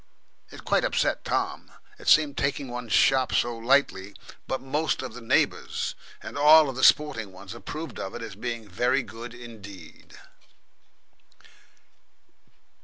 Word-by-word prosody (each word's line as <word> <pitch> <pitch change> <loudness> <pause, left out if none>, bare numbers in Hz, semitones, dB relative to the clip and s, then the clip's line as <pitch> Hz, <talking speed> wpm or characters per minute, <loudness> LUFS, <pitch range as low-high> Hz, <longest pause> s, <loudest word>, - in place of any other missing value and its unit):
It - - -12
quite - - +2
upset - - 0
Tom - - -2 0.3
it - - -13
seemed 150 -2 +5
taking 140 -1 -2
one's 120 -2 -6
shop 130 +2 +4
so 120 0 +1
lightly; 115 -5 +1 0.3
but 130 - -2
most 150 +3 -1
of 130 - -6
the 125 - -9
neighbours, 115 - 0 0.3
and - - -6
all 150 -1 +7
the 130 +1 -4
sporting 115 -9 +3
ones, 95 +1 -10
approved 160 +2 -7
of 95 - -5
it 120 - -6
as 115 - -7
being 115 +1 -5
very 125 +8 +1
good 115 +2 -9
indeed. 100 -8 -12
120 Hz, 135 wpm, -26 LUFS, 110-140 Hz, 0.3 s, all